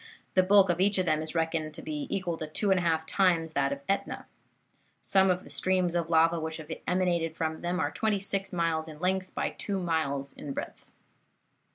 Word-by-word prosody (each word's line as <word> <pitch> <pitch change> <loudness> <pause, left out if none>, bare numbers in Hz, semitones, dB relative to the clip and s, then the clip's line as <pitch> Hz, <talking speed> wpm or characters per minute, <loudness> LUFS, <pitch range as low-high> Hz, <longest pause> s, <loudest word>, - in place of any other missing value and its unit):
The 185 - +5
bulk 195 0 +5
of 175 - -2
each 200 +1 +3
of 185 - +1
them 155 -2 +1
is 155 +1 -5
reckoned 160 -2 -1
to 165 - -8
be 150 -2 -4
equal 185 -4 -1
to 155 - -5
two 195 +6 0
and 190 - +4
a - - -1
half 160 -2 +1
times 165 -3 +2
that 140 -2 +1
of 140 0 -4
Etna. 195 - -2 0.8
Some 190 0 +4
of 180 0 +1
the - - -13
streams 185 -2 +1
of 170 -1 -1
lava 165 0 +4
which 160 0 -3
have 160 0 -9 0.2
emanated 175 -3 +1
from 160 -1 -2
them 175 +1 -1
are - - 0
twenty 215 -3 0
six 195 0 0
miles 165 -3 0
in 155 -1 -10
length 185 +1 0
by - - -1
two 200 -2 -3
miles 150 -6 -1
in 140 - -7
breadth. - - -7
170 Hz, 215 wpm, -29 LUFS, 160-185 Hz, 0.8 s, The